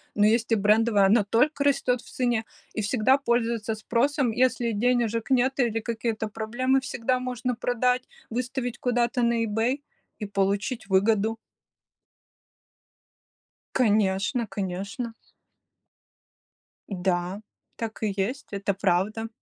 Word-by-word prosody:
но 210 - +4
есть 225 +2 +2
и - - +6
брендовое- 210 0 +4
оно 205 +1 +4
только 280 +8 +2
растет 255 -3 +2
в - - -16
цене 240 -3 0 0.3
и 215 - -2
всегда 245 +5 +3
пользуется 235 -4 0
спросом. 245 +4 +1
Если 245 0 +1
денежек 230 0 0
нет 265 +1 +2
или 230 -3 +2
какие-то 225 -1 -2
проблемы, 240 +5 0
всегда 255 -1 -1
можно 250 0 -2
продать, 250 +1 +1 0.3
выставить 245 +1 -3
куда-то 245 0 +1
на 235 -1 +2
Ebay 225 +6 0 0.4
и 210 - -3
получить 200 +3 -1
выгоду. 215 +3 +2 2.4
Конечно, 210 0 +2
конечно! 200 +4 -4 1.8
Да, 180 0 -1 0.3
так 225 -1 -5
и 210 -2 0
есть, 245 +9 -2
это 200 0 -1
правда! 195 +4 0
230 Hz, 115 wpm, -26 LUFS, 210-250 Hz, 2.4 s, и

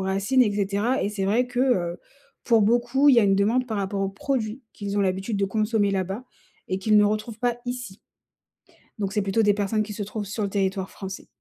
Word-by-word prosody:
racines, 195 +7 +2
et 210 -4 +1
cetera. 205 +5 0
Et - - 0
c'est 200 -2 -3
vrai 235 +6 +2
que, 245 0 -2
heu, 180 -10 +1 0.5
pour 230 -3 +4
beaucoup, 240 +6 +3
il 275 - +7
y 235 - +6
a - - +3
une 195 -1 +4
demande 230 +6 +2
par 220 -3 -3
rapport 195 0 -2
aux 195 - 0
produits 230 +3 -3
qu'ils 205 -1 -4
ont - - +3
l'habitude 195 +3 -1
de 200 - +1
consommer 215 0 +1
là-bas 195 +5 -2 0.4
et 185 - -1
qu'ils 215 +2 +3
ne 210 - +6
retrouvent 215 +2 -2
pas 240 0 0
ici. 245 -5 -5 1.0
Donc 195 -2 -2
c'est 210 - 0
plutôt 195 +3 +1
des 205 -1 +4
personnes 210 +1 0
qui 210 - -7
se 205 - -4
trouvent 210 +1 -4
sur 210 +2 -4
le 200 - -1
territoire 195 -1 -1
français. 190 -1 -8
210 Hz, 225 wpm, -25 LUFS, 195-235 Hz, 1.0 s, il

